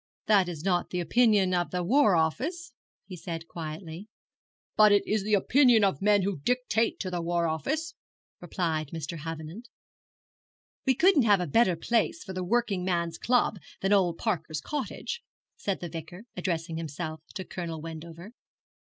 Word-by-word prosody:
'That 195 -4 +4
is 160 -3 -6
not 180 -2 +1
the 180 - -2
opinion 205 -1 +3
of 175 -1 0
the 180 -1 -2
War 225 0 +4
Office,' 255 - -1 0.3
he 190 - -8
said 165 -1 -6
quietly. 165 +3 -7 0.7
'But 215 -1 +7
it 205 - +4
is 215 0 0
the 210 +1 +2
opinion 245 +1 +4
of 190 -8 +1
men 205 -1 +4
who 190 -4 -2
dictate 230 - 0
to 185 - -3
the 175 -1 -2
War 170 0 0
Office,' 300 - -2 0.5
replied 165 -3 -2
Mr. 160 +1 -5
Havenant. 165 +8 -7 1.2
'We 265 - +4
couldn't 345 +2 +5
have 205 -3 +5
a 180 - -1
better 185 +3 +3
place 235 - 0
for 190 - -7
the 185 0 -3
working 205 -2 0
men's 170 -2 -1
club 240 -4 +2 0.2
than 195 +2 +2
old 180 -4 +3
Parker's 165 -8 -2
cottage,' 300 - -4 0.3
said 195 -2 -3
the 175 - -5
Vicar, 165 +4 -8
addressing 165 -2 -2
himself 155 0 -5
to 190 -3 -5
Colonel 170 -3 -5
Wendover. 165 +4 -9
180 Hz, 160 wpm, -28 LUFS, 165-220 Hz, 1.2 s, But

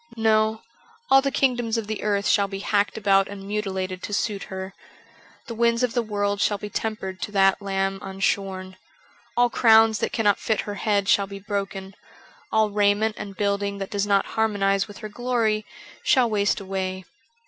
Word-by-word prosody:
No; 220 0 +2 0.5
all 270 0 +8
the 275 - 0
kingdoms 245 -4 +1
of 225 - -2
the 215 0 -4
earth 205 -1 0
shall 200 -1 +3
be 195 0 -6
hacked 205 +1 0
about 195 -2 +3
and 200 -1 -9
mutilated 190 -3 -3
to 205 - -6
suit 200 -1 -2
her. 190 0 -7 0.7
The 235 - -6
winds 235 +1 +2
of 250 - 0
the 245 - +1
world 205 -2 -1
shcill 205 0 +1
be 205 0 -7
tempered 190 -4 -4
to - - -4
that 195 0 +3
lamb 195 -1 -1
unshorn. 190 -1 -2 0.6
All 245 0 +4
crowns 225 -3 +5
that - - -1
cannot 215 -6 +2
fit 220 - 0
her 205 - -6
head 200 -1 0
shall 200 0 +3
be 200 0 -8
broken; 195 -1 -4 0.6
all 220 -1 +2
raiment 205 +1 +2
and 200 -1 -7
building 200 0 -1
that 195 -1 -6
does 205 0 -1
not 200 -1 +3
harmonize 195 -3 +1
with 205 - -11
her 215 - -7
glory 225 -2 -1 0.3
shall 255 -3 +3
waste 205 -2 +1
away. 190 -1 -4
205 Hz, 180 wpm, -24 LUFS, 195-220 Hz, 0.7 s, all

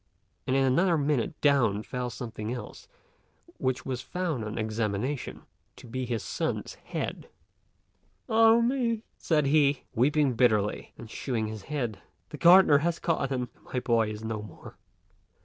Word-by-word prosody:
and 130 - +1
in 135 - +3
another 165 +7 +3
minute 145 0 -1
down 120 -8 +3
fell 125 +1 -4
something 115 -2 -6
else, 125 - -7 0.7
which 130 -1 -1
was 130 -2 -3
found 165 -5 -3
on 105 0 -5
examination 110 +4 -2 0.3
to 125 - -14
be 125 +2 -4
his 115 -3 -2
son's - - -3
head. - - -6 1.0
"Ah 225 +1 +5
me!" 235 -2 0 0.2
said 150 -3 +1
he, 140 -1 +3
weeping 140 +2 +2
bitterly 110 -4 +1
and 115 - -9
shewing 120 -5 -2
the 105 - -11
head; 130 -8 -3 0.3
"the 150 - -8
gardener 170 -1 +7
has 170 +2 0
caught 160 -5 -1
him, 125 -3 -2
and - - -28
my - - +2
boy 115 -3 +1
is 105 0 -7
no 110 -1 -3
more." 105 -6 -12
130 Hz, 150 wpm, -28 LUFS, 115-150 Hz, 1.0 s, gardener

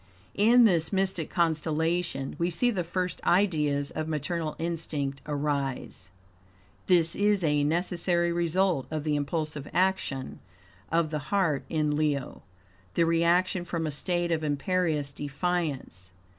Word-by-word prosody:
In 235 +4 +5
this 170 -6 +2
mystic 190 -4 0
constellation, 160 -2 0
we 170 +1 +1
see 240 +8 +1
the 185 -6 -1
first 180 +2 -3
ideas 150 -7 +2
of 155 0 -4
maternal 155 +1 -2
instinct 155 -5 -3
arise. 140 - -2 0.8
This 170 -3 +4
is 205 -2 +2
a 150 -2 +2
necessary 170 +2 +1
result 170 -2 +1
of 155 -2 -3
the 150 -1 0
impulsive 150 0 -2
action 185 -8 0 0.5
of 165 -1 +1
the 150 -1 -4
heart 165 -9 +1
in 150 -2 0
Leo 145 -3 -1 0.5
the 170 - +3
reaction 170 +2 +2
from 170 -2 -3
a 155 - -2
state 175 +4 -1
of 160 -1 0
imperious, 150 0 0
defiance. 145 - -3
165 Hz, 130 wpm, -28 LUFS, 150-175 Hz, 0.8 s, In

